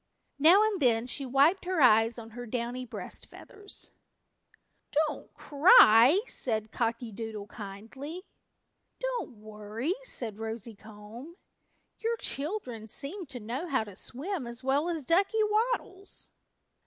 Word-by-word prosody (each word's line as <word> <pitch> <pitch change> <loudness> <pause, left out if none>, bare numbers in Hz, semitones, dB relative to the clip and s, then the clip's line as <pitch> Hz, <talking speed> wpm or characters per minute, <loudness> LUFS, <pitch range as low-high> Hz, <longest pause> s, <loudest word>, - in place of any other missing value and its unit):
Now 345 +8 +7
and 425 -5 0
then 235 -3 +3
she 265 +2 -3
wiped 285 +9 +3
her 365 -2 -1
eyes 225 -3 +5
on 225 -1 -9
her 245 +2 -8
downy 245 +2 -3
breast - - -7
feathers. 410 0 -10 1.0
"Don't 305 0 -1
cry," 285 - +7
said 220 - -2
Cocky 230 0 -2
Doodle 215 -1 -6
kindly. 225 - -8 0.8
"Don't - - -3
worry," 215 - -4
said 230 - -3
Rosy 225 0 -5
Comb. 220 +8 -12 0.6
"Your 460 +1 -1
children 275 - -4
seem 310 - -4
to 260 -3 -8
know 245 +10 -4
how 265 -8 +1
to 205 -3 -11
swim 285 - -5
as 235 +2 -6
well 280 +5 +1
as 325 -4 -3
Ducky 390 - +3
Waddles." 425 -2 -2
255 Hz, 130 wpm, -29 LUFS, 225-350 Hz, 1.0 s, Now